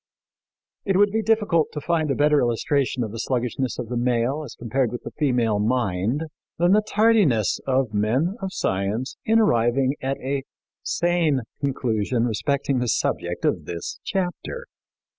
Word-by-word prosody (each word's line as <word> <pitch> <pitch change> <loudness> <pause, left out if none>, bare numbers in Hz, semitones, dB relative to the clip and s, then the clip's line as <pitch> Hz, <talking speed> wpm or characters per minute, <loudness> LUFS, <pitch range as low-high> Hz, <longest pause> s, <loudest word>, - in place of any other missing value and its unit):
" - - -69 0.3
It 195 -2 +1
would 205 0 +4
be 220 +1 +1
difficult 210 -8 +2
to 150 - -3
find 160 0 0
a 135 - +1
better 150 0 +4
illustration 125 +2 0
of 110 - -4
the 115 - -6
sluggishness 125 +2 -1
of 125 - -4
the 125 - -2
male 125 +4 +1
as 135 - -9
compared 120 +1 -1
with 120 - -6
the - - -7
female 120 -8 +1
mind 110 - 0 0.3
than 175 +2 +3
the 210 +2 +5
tardiness 210 - +3
of 130 -4 +1
men 125 - +1
of 190 -1 -3
science 105 - -2
in 225 +1 +4
arriving 130 - +3
at 135 +1 -1
a 135 +1 -2 0.4
sane 170 -6 +1 0.2
conclusion 120 -3 0
respecting 135 +3 0
the 125 - -1
subject - - -1
of - - 0
this 85 -1 -5
chapter. 195 - -3
135 Hz, 160 wpm, -23 LUFS, 120-170 Hz, 0.4 s, the